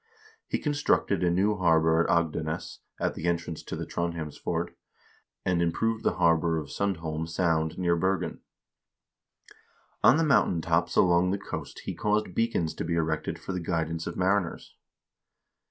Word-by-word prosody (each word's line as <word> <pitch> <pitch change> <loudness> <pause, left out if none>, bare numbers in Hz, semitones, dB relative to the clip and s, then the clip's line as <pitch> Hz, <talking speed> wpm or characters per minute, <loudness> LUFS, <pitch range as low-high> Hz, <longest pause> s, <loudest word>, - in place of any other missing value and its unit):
He - - 0
constructed 145 - +1
a 90 - +3
new 100 +4 +2
harbor 80 -3 +3
at 85 - +2
Agdenes, 80 -2 -1 0.2
at - - 0
the 80 - -6
entrance 85 -1 -2
to - - -6
the - - -4
Trondhjemsfjord, 85 -3 -3 0.7
and 90 -2 +2
improved 110 +7 0
the - - +1
harbor 85 -1 +3
of 75 -3 -5
Sundholm 80 -5 -2
Sound 80 -2 0
near 85 -2 +2
Bergen. 95 +3 -1 1.6
On 140 - +7
the 165 - +2
mountain 140 - +3
tops 80 +1 0
along 90 0 +4
the 100 - 0
coast 100 - -7
he - - -3
caused 105 -2 0
beacons 115 -8 0
to - - -4
be 85 0 -1
erected 80 -1 -1
for 95 - -6
the 90 - -2
guidance 80 -1 -2
of - - -5
mariners. 95 -1 0
85 Hz, 155 wpm, -28 LUFS, 80-95 Hz, 1.6 s, On